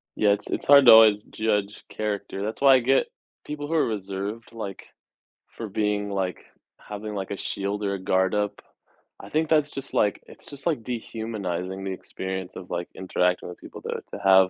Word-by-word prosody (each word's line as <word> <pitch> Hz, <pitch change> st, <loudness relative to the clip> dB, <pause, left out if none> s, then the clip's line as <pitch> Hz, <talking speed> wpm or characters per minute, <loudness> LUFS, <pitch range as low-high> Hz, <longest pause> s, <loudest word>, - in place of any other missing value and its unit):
Yeah, 105 Hz, -, +3 dB
it's 100 Hz, -, -1 dB
it's -, -, -3 dB
hard 140 Hz, -1 st, +8 dB
to -, -, +11 dB
always 110 Hz, -2 st, +7 dB
judge 105 Hz, -2 st, -1 dB
character, 100 Hz, -2 st, -3 dB
that's 110 Hz, +5 st, -4 dB
why 135 Hz, -1 st, +8 dB
I -, -, +5 dB
get 130 Hz, +2 st, +3 dB, 0.4 s
people 150 Hz, 0 st, -5 dB
who 165 Hz, -, -3 dB
are 160 Hz, -, +3 dB
reserved, 100 Hz, +1 st, -4 dB
like, 100 Hz, -4 st, -6 dB, 0.7 s
for 115 Hz, -, -4 dB
being, 105 Hz, 0 st, -1 dB
like 95 Hz, -3 st, -2 dB, 0.4 s
having, 105 Hz, +1 st, -7 dB
like, 95 Hz, -2 st, -4 dB
a 100 Hz, -, -4 dB
shield 100 Hz, +2 st, -3 dB
or 100 Hz, -, 0 dB
a 100 Hz, -, -3 dB
guard 95 Hz, +1 st, +2 dB
up. 105 Hz, -1 st, -1 dB, 0.6 s
I -, -, -10 dB
think 155 Hz, 0 st, 0 dB
that's 150 Hz, -2 st, +3 dB
just, 135 Hz, 0 st, -8 dB
like 105 Hz, -, +1 dB
it's -, -, -15 dB
just, 140 Hz, -1 st, -10 dB
like, 155 Hz, -10 st, 0 dB
dehumanizing 100 Hz, -6 st, -4 dB
the 95 Hz, -, -3 dB
experience 95 Hz, 0 st, -5 dB
of, 90 Hz, -, -9 dB
like, 85 Hz, 0 st, -2 dB
interacting 90 Hz, -1 st, 0 dB
with 90 Hz, -, -10 dB
people -, -, -11 dB
to -, -, -6 dB, 0.2 s
to -, -, -5 dB
have 95 Hz, -1 st, +6 dB
105 Hz, 195 wpm, -25 LUFS, 95-115 Hz, 0.7 s, to